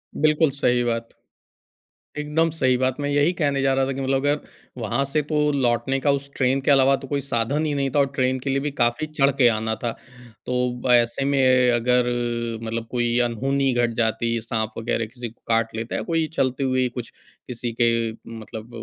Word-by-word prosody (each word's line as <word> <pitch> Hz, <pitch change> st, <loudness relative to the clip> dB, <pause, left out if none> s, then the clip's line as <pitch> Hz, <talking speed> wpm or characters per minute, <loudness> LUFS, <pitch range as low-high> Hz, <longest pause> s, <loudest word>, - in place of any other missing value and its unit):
बिल्कुल 155 Hz, 0 st, +3 dB
सही 125 Hz, -3 st, +1 dB
बात। 115 Hz, -1 st, -2 dB, 1.1 s
एकदम 150 Hz, +2 st, +1 dB
सही 130 Hz, -5 st, +1 dB
बात। 130 Hz, 0 st, 0 dB
मैं 145 Hz, 0 st, -1 dB
यही 145 Hz, +3 st, +3 dB
कहने 140 Hz, -5 st, 0 dB
जा 135 Hz, 0 st, +2 dB
रहा 135 Hz, 0 st, +2 dB
था 135 Hz, -, -2 dB
कि 135 Hz, -, -4 dB
मतलब 135 Hz, 0 st, +1 dB
अगर 145 Hz, +1 st, +2 dB, 0.4 s
वहाँ 120 Hz, +3 st, -1 dB
से 145 Hz, +2 st, 0 dB
तो 150 Hz, 0 st, +1 dB
लौटने 135 Hz, -1 st, +1 dB
का 140 Hz, +1 st, +2 dB
उस 140 Hz, 0 st, -2 dB
ट्रेन 135 Hz, +1 st, +1 dB
के 145 Hz, -, +2 dB
अलावा 135 Hz, 0 st, +5 dB
तो 135 Hz, -, -9 dB
कोई 140 Hz, 0 st, -1 dB
साधन 140 Hz, +3 st, -1 dB
ही 150 Hz, -, -1 dB
नहीं 140 Hz, -1 st, 0 dB
था -, -, +4 dB
और 140 Hz, -, +5 dB
ट्रेन 130 Hz, 0 st, +1 dB
के 135 Hz, +2 st, -4 dB
लिए 135 Hz, +1 st, +1 dB
भी 145 Hz, +1 st, -3 dB
काफ़ी 120 Hz, +3 st, 0 dB
चढ़ 140 Hz, -2 st, +2 dB
के 125 Hz, -3 st, +6 dB
आना 110 Hz, 0 st, -1 dB
था। 120 Hz, -, 0 dB, 0.5 s
तो 125 Hz, -1 st, -1 dB
ऐसे 120 Hz, +2 st, +2 dB
में 140 Hz, -1 st, +2 dB, 0.3 s
अगर 125 Hz, +1 st, +2 dB, 0.5 s
मतलब 115 Hz, 0 st, -4 dB
कोई 120 Hz, -1 st, 0 dB
अनहोनी 135 Hz, +3 st, 0 dB
घट 120 Hz, -1 st, +1 dB
जाती, 115 Hz, +1 st, 0 dB
साँप 110 Hz, -1 st, -2 dB
वग़ैरह 115 Hz, 0 st, -1 dB
किसी 120 Hz, +1 st, -7 dB
को 115 Hz, -, -24 dB
काट 115 Hz, -1 st, +1 dB
लेता 115 Hz, +1 st, -4 dB
है, -, -, -1 dB
या -, -, -4 dB
कोई 165 Hz, -1 st, 0 dB
चलते 130 Hz, -1 st, 0 dB
हुए 130 Hz, -1 st, +1 dB
ही 125 Hz, -, +1 dB
कुछ 120 Hz, -1 st, -7 dB, 0.4 s
किसी 120 Hz, -1 st, -4 dB
के 115 Hz, -1 st, +2 dB, 0.3 s
मतलब 110 Hz, +1 st, -9 dB
130 Hz, 205 wpm, -23 LUFS, 120-140 Hz, 1.1 s, के